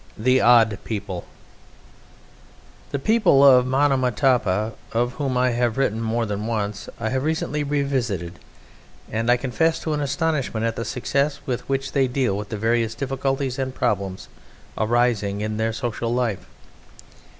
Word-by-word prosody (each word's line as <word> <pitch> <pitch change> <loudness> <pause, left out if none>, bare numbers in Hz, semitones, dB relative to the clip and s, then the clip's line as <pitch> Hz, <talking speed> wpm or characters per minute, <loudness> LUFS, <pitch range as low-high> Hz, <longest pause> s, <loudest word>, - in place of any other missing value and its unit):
THE 130 +4 +3
ODD 115 -4 +5
PEOPLE 100 -5 -5 1.6
The - - -2
people 140 -4 +4
of 125 -2 +7
Monomotapa, 125 -6 +2 0.2
of 120 +2 0
whom 130 -3 0
I 125 0 +3
have 120 0 0
written 115 -5 0
more 115 +1 0
than 105 +1 -3
once, 105 -3 -3
I 110 -1 -1
have 130 +1 -1
recently 150 -1 -1
revisited; 130 - -2 0.7
and 115 +2 -1
I 120 - +5
confess 160 +6 0
to 155 - -2
an 150 - -1
astonishment 140 -6 -1
at 115 0 -1
the 115 - -4
success 140 +5 -1
with 125 0 -4
which 135 0 -1
they 135 -2 +2
deal 125 -5 0
with 105 0 -5
the 110 - -4
various 115 +1 0
difficulties 135 0 -2
and 130 -1 -3
problems 100 -6 -2 0.5
arising 110 -3 +1
in 110 0 -2
their 110 +1 0
social 115 0 -3
life. 120 -5 -1
120 Hz, 150 wpm, -23 LUFS, 110-135 Hz, 1.6 s, of